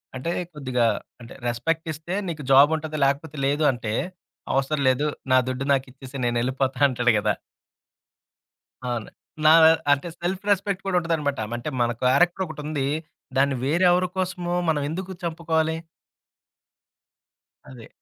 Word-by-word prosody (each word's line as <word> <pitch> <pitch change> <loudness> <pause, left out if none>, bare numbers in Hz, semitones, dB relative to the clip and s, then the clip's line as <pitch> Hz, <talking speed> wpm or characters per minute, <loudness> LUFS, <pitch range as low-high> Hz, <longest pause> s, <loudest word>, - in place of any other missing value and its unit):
అంటే 130 +6 -3 0.2
కొద్దిగా 130 -5 0 0.4
అంటే 115 - -11
రెస్పెక్ట్ 150 +8 -1
ఇస్తే 160 +4 -7
నీకు 155 -3 -5
జాబ్ 140 +2 +8
ఉంటది, 155 0 -4
లేకపోతే 140 +2 -1
లేదు 145 +3 +1
అంటే, 115 -4 -4 0.6
అవసరం 135 +2 0
లేదు. 135 +4 +1 0.2
నా 130 - +6
దుడ్డు 130 +1 -3
నాకిచ్చేసేయు, 135 0 -4
నేనెళ్ళిపోతా 130 +3 0
అంటాడు 125 -2 +2
కదా! - - +1 1.5
అవును. 120 -3 -3 0.4
నా 155 - +8 0.4
అంటే 145 +3 +2
సెల్ఫ్ 185 +2 -3
రెస్పెక్ట్ 195 -1 0
కూడా 185 -2 +2
ఉంటదనమాట. 155 -5 -1 0.2
అంటే 120 - -4
మన 120 0 +2
క్యారెక్టరొకటుంది. 150 0 +1 0.5
దాన్ని 135 0 +3
వేరే 165 +7 +2
ఎవరి 180 +1 +2
కోసము 180 -1 -2 0.2
మనం 150 -2 +1
ఎందుకు 185 +4 -5
చంపుకోవాలి? 160 -1 0 2.0
అదే. 120 -4 -12
145 Hz, 125 wpm, -24 LUFS, 130-165 Hz, 2.0 s, జాబ్